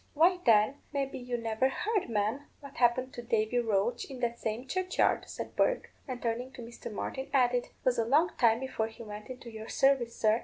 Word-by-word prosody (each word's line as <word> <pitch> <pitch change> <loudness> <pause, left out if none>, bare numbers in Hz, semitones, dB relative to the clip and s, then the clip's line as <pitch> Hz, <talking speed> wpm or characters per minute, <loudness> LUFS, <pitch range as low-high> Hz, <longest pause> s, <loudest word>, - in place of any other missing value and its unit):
"Why, 355 +4 +5
then, 220 +4 +5
maybe 275 -2 -2
you 245 -1 -3
never 230 +3 +1
heard, 415 - -1
ma'am, 225 +6 -1
what 280 -2 -12
happened 255 +2 +2
to 240 - -6
Davy 230 0 +1
Roche 220 0 0
in 265 -2 -7
that 235 -1 -1
same 225 +3 -3
churchyard," 370 +4 +1
said - - -6
Bourke; - - +1 0.2
and 255 -2 -4
turning 240 +2 -2
to 245 - -8
Mr. 235 0 -8
Martin, 265 +5 -4
added, 250 -3 +3 0.2
"'Twas 250 -2 +2
a 230 - +2
long 300 +9 +4
time 230 -2 +5
before 260 -4 -1
he 225 +1 -11
went 210 -1 -8
into 250 -2 -8
your 220 0 -8
service, 265 -4 +2
sir. 220 +1 +3
245 Hz, 200 wpm, -31 LUFS, 225-270 Hz, 0.2 s, Why